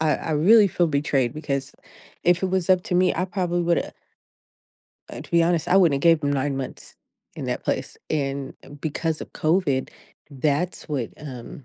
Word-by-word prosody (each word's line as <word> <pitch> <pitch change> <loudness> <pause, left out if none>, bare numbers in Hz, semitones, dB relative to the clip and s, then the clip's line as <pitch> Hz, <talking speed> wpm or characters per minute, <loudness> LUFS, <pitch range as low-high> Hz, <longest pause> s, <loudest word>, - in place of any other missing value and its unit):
I 155 -1 +2
I 160 - -5
really 200 +8 +6
feel 175 -1 +1
betrayed 140 -4 0
because 140 -3 -3 0.5
if 175 +1 +3
it - - +2
was 185 -1 0
up 185 -1 +4
to 180 - -2
me, 185 +1 +3
I 180 - 0
probably 180 -2 -1
woulda 170 0 0 1.2
uh, - - -7
to - - -12
be 170 0 +4
honest, 170 0 +1
I 185 - +4
wouldn't 170 -7 +5
have 140 - -5
gave 165 -2 +4
him 145 - +1
9 140 0 -1
months 135 -1 -7 0.4
in - - -5
that - - -3
place, - - -2
and 140 -3 -2
e - - -14
because 160 +1 -2
of - - -9
COVID, 155 -5 0 0.4
that's 150 +7 -1
what, 135 -7 -2
um 130 -2 -9
155 Hz, 190 wpm, -24 LUFS, 140-175 Hz, 1.2 s, really